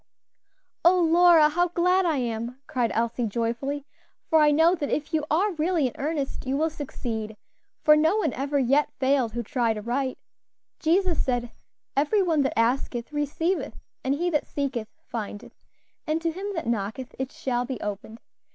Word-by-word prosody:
"Oh, 360 +2 +6
Lora, 340 -1 +6
how 350 +4 +1
glad 360 +2 +2
I 315 -3 +1
am!" 235 0 -3
cried 245 -3 0
Elsie, 235 +1 0
joyfully, 235 +6 -2 0.5
"for 320 - +6
I 300 -1 +6
know 320 +4 +5
that 300 -6 -2
if 305 +2 -2
you 310 -1 +1
are 380 +7 +2
really 325 -2 +1
in 250 - -1
earnest, 285 -2 -3
you 270 +1 0
will 320 +2 +1
succeed; 225 -7 -5 0.5
for 300 - +7
no 320 +6 +3
one 320 - 0
ever 280 +2 -1
yet 275 +3 +2
failed 260 -4 +1
who 240 0 -2
tried 235 -2 0
aright. 250 +5 -2 0.6
Jesus 345 +1 +2
said, 245 -2 -1 0.4
'Every 305 +9 +3
one 325 -5 +2
that 270 - -1
asketh, 240 +2 0
receiveth; 305 +5 -1 0.3
and 265 +2 +1
he 350 +4 -1
that 300 - 0
seeketh, 265 -6 -3 0.2
findeth; 225 +1 -6 0.5
and 310 +1 +1
to 335 - +1
him 380 +5 -5
that 330 - -3
knocketh, 230 +3 -3
it 265 0 -3
shall 245 -2 -2
be 255 -3 -5
opened.' 210 +2 -6
280 Hz, 170 wpm, -26 LUFS, 240-320 Hz, 0.6 s, for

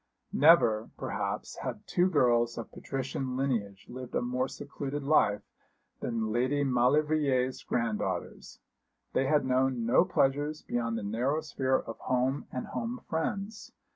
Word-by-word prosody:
Never, 125 -8 +5
perhaps, - - -3
had - - -5
two 180 +1 +2
girls 120 -7 +3
of 115 - -6
patrician 130 -1 -4
lineage 110 -8 -2
lived 125 0 -8
a - - +2
more 125 +1 0
secluded 145 +1 -5
life 135 -8 +3 0.6
than 115 -2 -2
Lady 130 +5 +1
Maulevrier's 135 0 +2
granddaughters. 105 -6 -3 0.5
They 135 - +2
had 150 -1 +3
known 130 -2 +1
no 120 - +5
pleasures 145 +3 0
beyond 115 -1 -1
the 110 - -4
narrow 125 +9 0
sphere 130 -4 0
of 115 - -7
home 130 +2 0
and 125 - -4
home 235 +2 -4
friends. 195 +6 -3
130 Hz, 135 wpm, -30 LUFS, 120-145 Hz, 0.6 s, Never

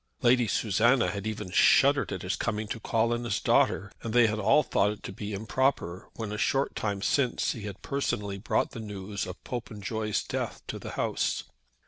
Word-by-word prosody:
Lady 120 -1 +4
Susanna 115 +5 +3
had 100 +1 -4
even 105 -3 -4
shuddered 140 +7 +5
at 95 -2 -4
his 90 - -1
coming 110 -2 -2
to 115 - -4
call 115 +1 +1
on 120 0 -2
his 120 - -1
daughter, 100 0 +2
and 115 - -4
they 120 -1 +7
had 110 -1 0
all 150 +8 +4
thought 100 - +2
it 105 - -6
to - - -5
be 105 +2 -6
improper 110 -3 -1
when 110 -2 -4
a 105 - -4
short 135 +4 +1
time 100 -2 -2
since 130 -4 +1
he 110 -3 -6
had 100 -2 -8
personally 105 -8 -2
brought - - 0
the - - -7
news 100 -2 -5
of 90 0 -9
Popenjoy's 110 -3 -3
death - - -4
to - - -5
the - - -7
house. - - 0
110 Hz, 195 wpm, -28 LUFS, 100-120 Hz, -, they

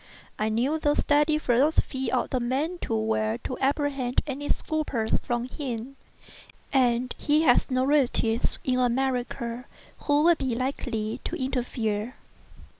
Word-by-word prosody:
I 215 +1 +1
knew 255 +8 0
the 295 -1 +2
steady 295 +1 +3
philosophy 265 -2 +1
of 255 - 0
the 255 - +1
man 280 +9 -1
too 225 - -2
well 220 0 0
to 255 - -3
apprehend 275 -2 0
any 290 0 -4
scruples 285 -8 -1
from 240 -1 -2
him; 255 -2 -5 0.8
and 250 -2 +2
he 305 +1 +3
had 245 -6 +4
no 255 0 +1
relatives 245 -5 +1
in 255 -1 +1
America 250 -1 -1 0.3
who 290 0 +2
would 340 -1 +5
be 255 -3 -1
likely 245 -3 -3
to - - -3
interfere. 240 -4 -2
255 Hz, 135 wpm, -26 LUFS, 235-290 Hz, 0.8 s, would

